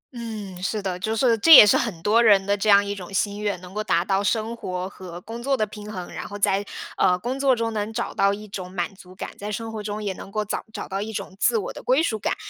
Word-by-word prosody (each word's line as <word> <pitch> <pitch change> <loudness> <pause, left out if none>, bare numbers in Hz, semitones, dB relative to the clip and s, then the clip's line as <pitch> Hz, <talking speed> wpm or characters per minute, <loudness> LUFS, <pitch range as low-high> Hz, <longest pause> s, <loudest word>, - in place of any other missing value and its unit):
嗯， 210 -6 -7
是 210 +3 -1
的。 190 -3 -3
就 220 +4 -2
是， 235 0 +3
这 325 - +4
也 - - +12
是 205 - +4
很 175 -8 -2
多 220 +3 +4
人 205 -4 +5
的 200 +1 +2
这 205 +1 -1
样 200 0 +6
一 200 - -3
种 190 -2 -9
心 200 +1 -1
愿， 205 -3 -1
能 180 0 -11
够 215 +1 -2
达 175 -4 +1
到 195 +1 +1
生 225 +2 0
活 185 -4 -4
和 180 -3 -9
工 225 +4 -8
作 270 +2 0
的 215 - +1
平 210 0 -9
衡， 185 -4 -7
然 - - -6
后 205 - -7
在， 200 0 +1 0.3
呃， 180 -2 +3
工 245 +8 -4
作 270 -2 +3
中 230 -1 -2
能 210 0 -2
找 235 +2 -3
到 200 - +3
一 210 +1 -6
种 190 -2 -7
满 185 +2 -3
足 185 -1 -15
感， - - -6
在 205 +1 -5
生 225 +2 -4
活 220 -1 -5
中 210 0 -5
也 200 -2 -2
能 195 - -11
够 215 +1 -2
找 210 - -3
找 - - -6
到 195 0 -3
一 215 +2 -4
种 190 -3 -6
自 235 +2 +3
我 205 - -4
的 - - -9
归 265 +5 +2
属 220 -9 -1
感。 - - -1
205 Hz, 305 characters per minute, -24 LUFS, 195-220 Hz, 0.3 s, 也